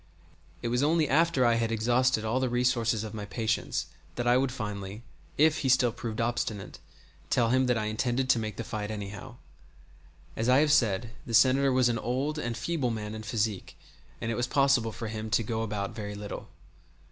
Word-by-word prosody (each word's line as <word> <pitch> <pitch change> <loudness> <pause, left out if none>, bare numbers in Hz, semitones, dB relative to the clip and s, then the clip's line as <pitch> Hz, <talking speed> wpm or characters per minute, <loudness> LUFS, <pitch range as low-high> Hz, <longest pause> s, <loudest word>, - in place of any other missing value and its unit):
It 120 - -1
was 125 +2 +1
only 155 +1 +3
after 155 -2 +3
I 120 - +4
had 115 0 0
exhausted 120 +1 +2
all 115 +4 +1
the 130 -1 0
resources 120 -3 +1
of 110 - -6
my 105 -2 -5
patience 110 +3 -1 0.3
that 120 - -2
I 120 0 +4
would 130 0 +2
finally, 105 -2 -6 0.3
if 155 +1 +4
he 135 - 0
still 125 -2 +4
proved 115 -1 -6
obstinate, 115 -3 -2 0.5
tell 115 -2 +2
him 130 0 +3
that 125 -2 +2
I 110 - -1
intended 120 +4 -1
to 115 - +2
make 110 -2 -4
the 115 - -4
fight 105 -2 -4
anyhow. 105 +4 -7 1.0
As 115 +3 0
I 130 - +6
have 150 +1 +4
said, 115 -6 +2 0.2
the 115 - 0
Senator 135 +3 +5
was 130 -1 +4
an 115 -1 0
old 135 +7 -2
and 120 -4 -3
feeble 135 +2 -1
man 105 -2 -4
in 110 - -6
physique, 110 -2 -2 0.4
and 115 - -2
it - - -1
was 120 +2 -1
possible 135 -5 +3
for 115 +1 -6
him 110 0 -5
to 115 +1 +2
go 110 +1 -2
about 105 -3 -3
very 105 -2 -6
little. 105 0 -7
115 Hz, 200 wpm, -28 LUFS, 110-130 Hz, 1.0 s, I